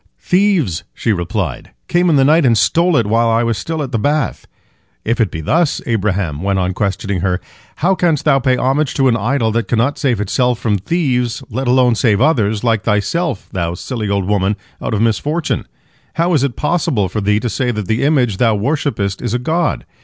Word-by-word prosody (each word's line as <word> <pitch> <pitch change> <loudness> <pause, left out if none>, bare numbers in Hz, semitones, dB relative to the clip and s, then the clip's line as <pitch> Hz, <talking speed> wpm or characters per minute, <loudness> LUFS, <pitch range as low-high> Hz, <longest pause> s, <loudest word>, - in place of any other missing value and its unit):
"Thieves," 180 - +1
she 110 - 0
replied, 85 - -3
"came 175 0 +2
in 160 - +3
the 135 -1 +4
night 155 +3 +4
and 120 -4 +3
stole 170 - +3
it, 115 - +2
while 115 +2 +2
I 115 +1 +2
was 115 -1 0
still 155 +10 -3
at 130 - -6
the 115 - 0
bath." 145 +4 -1 0.6
"If 115 +2 0
it 110 - +2
be 80 - -6
thus," 160 - +1
Abraham 95 - -1
went 100 0 0
on 95 0 0
questioning 100 -1 -2
her, 90 -1 0 0.4
"how 180 +5 +1
canst 175 -6 0
thou 135 -3 +4
pay 130 -1 +1
homage 135 +3 0
to 135 -1 +3
an 115 - +2
idol 115 +1 0
that 115 +1 -1
cannot 120 +5 0
save 125 -7 +1
itself 125 +4 0
from 105 -4 0
thieves, 125 - -1
let 130 +4 -3
alone 125 -1 +4
save 115 -3 +2
others, 110 -7 +1
like 115 -3 +1
thyself, 110 - -1
thou 85 -2 -2
silly 110 +1 -4
old 100 -2 0
woman, 100 0 +1 0.3
out - - -2
of 105 - +1
misfortune? 145 - -1 0.5
How 170 +2 +1
is 145 -4 +2
it 140 -4 -1
possible 150 - 0
for 105 +4 -3
thee 105 +1 +2
to 120 - -3
say 125 +2 -1
that 105 -4 -2
the 110 +1 0
image 130 -9 +2
thou 115 -1 +2
worshippest 105 -5 -1
is 115 - -2
a - - +2
god? 160 +5 -1
115 Hz, 205 wpm, -16 LUFS, 105-145 Hz, 0.6 s, the